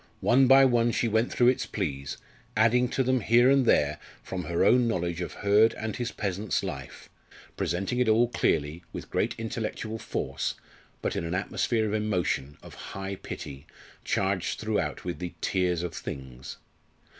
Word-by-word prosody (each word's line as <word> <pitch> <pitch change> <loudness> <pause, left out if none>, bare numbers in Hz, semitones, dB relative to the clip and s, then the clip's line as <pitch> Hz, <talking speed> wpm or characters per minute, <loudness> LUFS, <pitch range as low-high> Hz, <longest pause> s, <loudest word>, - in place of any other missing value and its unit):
One 130 +2 +5
by 135 +1 +8
one 120 -2 +3
she 115 - 0
went 110 +2 +1
through 120 0 +4
its 130 - 0
pleas, 70 -1 -3 0.4
adding 120 +3 +4
to 135 - 0
them 130 0 +2
here 120 +4 +5
and 135 -3 +3
there 75 -5 +3 0.2
from 90 -3 -5
her 85 +2 +1
own 120 +3 +5
knowledge 85 -5 -1
of 90 - -4
Hurd 105 +3 +5
and 110 -1 -4
his 120 -1 -3
peasant's 100 -1 -2
life - - -7 0.5
presenting 95 +8 -1
it 125 -3 +3
all 115 +2 +4
clearly, 80 -7 0
with - - -8
great - - 0
intellectual 110 0 -4
force, - - -3 0.5
but - - -1
in - - -2
an 85 +2 -2
atmosphere 110 +3 0
of 105 - -2
emotion, 90 -10 -1
of - - -11
high 95 0 -6
pity, 70 -5 -8 0.4
charged 95 -2 -1
throughout 110 -3 -2
with 90 - -4
the 90 -1 -5
"tears 90 -3 0
of 85 -2 -4
things." 65 -5 -7
105 Hz, 170 wpm, -27 LUFS, 90-120 Hz, 0.5 s, by